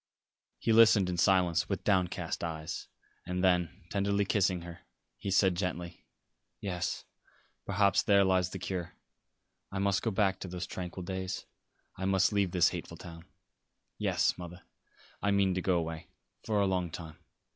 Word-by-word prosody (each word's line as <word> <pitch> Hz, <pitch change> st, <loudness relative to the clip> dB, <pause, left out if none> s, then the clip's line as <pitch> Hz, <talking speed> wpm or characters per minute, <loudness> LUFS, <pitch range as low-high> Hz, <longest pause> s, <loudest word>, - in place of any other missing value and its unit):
He 115 Hz, -, +1 dB
listened 110 Hz, -4 st, +6 dB
in 90 Hz, -, -2 dB
silence, 90 Hz, -2 st, +3 dB
with -, -, -2 dB
downcast 95 Hz, -5 st, 0 dB
eyes, 80 Hz, 0 st, -4 dB, 0.4 s
and 90 Hz, +1 st, -3 dB
then, 90 Hz, -3 st, +1 dB
tenderly 100 Hz, 0 st, +1 dB
kissing 95 Hz, -3 st, +1 dB
her, 85 Hz, -1 st, -9 dB, 0.4 s
he 100 Hz, -, -4 dB
said 95 Hz, 0 st, +4 dB
gently: 90 Hz, -1 st, -4 dB, 0.5 s
"Yes, 90 Hz, -3 st, -3 dB, 0.6 s
perhaps 100 Hz, -1 st, +3 dB
there 100 Hz, -1 st, +5 dB
lies 95 Hz, -1 st, +2 dB
the 95 Hz, -, -6 dB
cure. 90 Hz, -2 st, -4 dB, 0.8 s
I 95 Hz, -, -4 dB
must 100 Hz, 0 st, +1 dB
go 115 Hz, -, 0 dB
back 95 Hz, -2 st, +1 dB
to -, -, -6 dB
those 90 Hz, 0 st, -4 dB
tranquil 90 Hz, 0 st, -6 dB
days. 95 Hz, +1 st, -4 dB, 0.5 s
I 95 Hz, -, -3 dB
must 95 Hz, +1 st, +3 dB
leave 100 Hz, -2 st, +2 dB
this 90 Hz, -1 st, +4 dB
hateful -, -, -7 dB
town. 85 Hz, -2 st, -10 dB, 0.7 s
Yes, -, -, +2 dB
mother, 90 Hz, +1 st, -9 dB, 0.6 s
I 100 Hz, -, +1 dB
mean 100 Hz, -2 st, +3 dB
to 90 Hz, -, -1 dB
go 90 Hz, -1 st, +2 dB
away 80 Hz, -1 st, -4 dB, 0.4 s
for 105 Hz, -2 st, +1 dB
a 100 Hz, -, +3 dB
long 90 Hz, -2 st, 0 dB
time. 80 Hz, -1 st, -8 dB
95 Hz, 155 wpm, -31 LUFS, 90-100 Hz, 0.8 s, listened